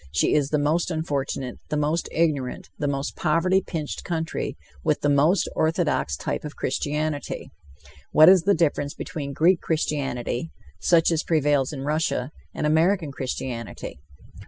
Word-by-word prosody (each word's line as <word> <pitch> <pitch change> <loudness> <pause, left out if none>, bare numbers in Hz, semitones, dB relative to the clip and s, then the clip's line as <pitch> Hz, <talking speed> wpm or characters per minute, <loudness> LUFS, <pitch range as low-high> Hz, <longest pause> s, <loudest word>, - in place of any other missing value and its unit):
She 75 - +2
is 145 -2 +2
the 150 - +2
most 155 +5 +1
unfortunate, 140 -5 -3
the 150 - 0
most 150 +3 0
ignorant, 150 -6 -1
the 145 - 0
most 140 0 -2
poverty 175 +4 +2
pinched 155 -6 -5
country, 165 -2 -3 0.3
with - - +1
the 145 - +2
most 155 +6 +3
orthodox 160 - +1
type - - -3
of 150 -1 -7
Christianity. 150 0 -2 0.6
What 155 +1 +7
is 185 -1 +8
the 200 +4 +3
difference 145 -3 0
between 140 -3 -5
Greek 170 +5 +3
Christianity, 140 -3 -2 0.3
such 170 -1 +4
as 165 -1 +1
prevails 145 -4 +2
in 140 -3 -6
Russia, 150 -3 -1 0.2
and - - -3
American 160 +1 +2
Christianity! 125 - -5
150 Hz, 145 wpm, -24 LUFS, 140-165 Hz, 0.6 s, is